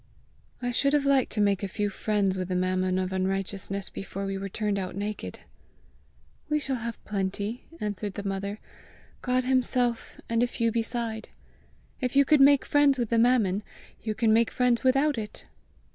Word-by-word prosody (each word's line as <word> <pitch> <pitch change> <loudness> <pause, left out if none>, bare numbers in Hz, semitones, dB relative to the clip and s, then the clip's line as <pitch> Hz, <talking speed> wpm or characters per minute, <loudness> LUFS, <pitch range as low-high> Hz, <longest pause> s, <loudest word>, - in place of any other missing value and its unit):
"I 245 - 0
should 275 +4 +2
have 290 -1 +2
liked 275 -2 +3
to - - -2
make 200 -2 +2
a 200 - -2
few 205 +2 -2
friends 200 -1 0
with 185 -1 -3
the 185 - -2
mammon 185 0 +1
of 185 0 -1
unrighteousness 195 +1 -2
before 195 +1 -5
we 195 0 -2
were 195 0 -4
turned 205 0 -1
out 185 -1 -4
naked!" 200 - -5 1.1
"We 300 0 +2
shall 270 -3 -2
have 235 -1 -6
plenty," 205 +3 -3
answered 205 -1 -3
the 205 0 -4
mother, 200 +1 -3 0.3
" - - -27
God 255 0 +1
himself, 250 -2 0
and 230 0 +1
a 245 - +3
few 230 -1 0
beside! 230 -1 -2 0.7
If 250 0 -2
you 280 0 +6
could 300 0 +5
make 280 0 +6
friends 290 -2 +4
with 240 -3 -1
the 230 - +3
mammon, 225 -5 +3 0.4
you 215 -1 -3
can 220 -1 +3
make 230 +1 +4
friends 250 -2 +1
without 270 +1 +3
it!" 210 -1 -7
220 Hz, 180 wpm, -27 LUFS, 195-250 Hz, 1.1 s, you